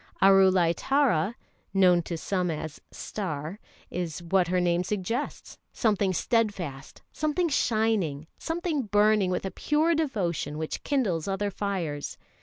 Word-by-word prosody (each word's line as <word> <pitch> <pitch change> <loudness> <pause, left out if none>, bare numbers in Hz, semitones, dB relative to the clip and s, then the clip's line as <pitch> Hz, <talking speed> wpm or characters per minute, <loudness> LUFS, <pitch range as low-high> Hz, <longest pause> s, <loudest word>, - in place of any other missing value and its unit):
Arulai 190 -3 +5
Tara 240 - +2 0.4
(known 180 -2 +5
to 170 0 -5
some 180 +2 -1
as 155 -1 -5
"Star") 175 -2 -5 0.3
is 175 -2 -4
what 180 +1 +2
her 180 +1 +1
name 175 0 +2
suggests, 210 +8 -3
something 205 -4 +1
steadfast, 185 - -1
something 310 +3 0
shining, 215 - +1
something 330 -3 -1
burning 210 -1 +3
with 180 +1 -1
a 190 - -3
pure 310 +3 +1
devotion 195 - -1
which 160 0 -4
kindles 205 - 0
other 200 +1 -1
fires. 175 -8 -3
190 Hz, 125 wpm, -27 LUFS, 170-225 Hz, 0.4 s, Arulai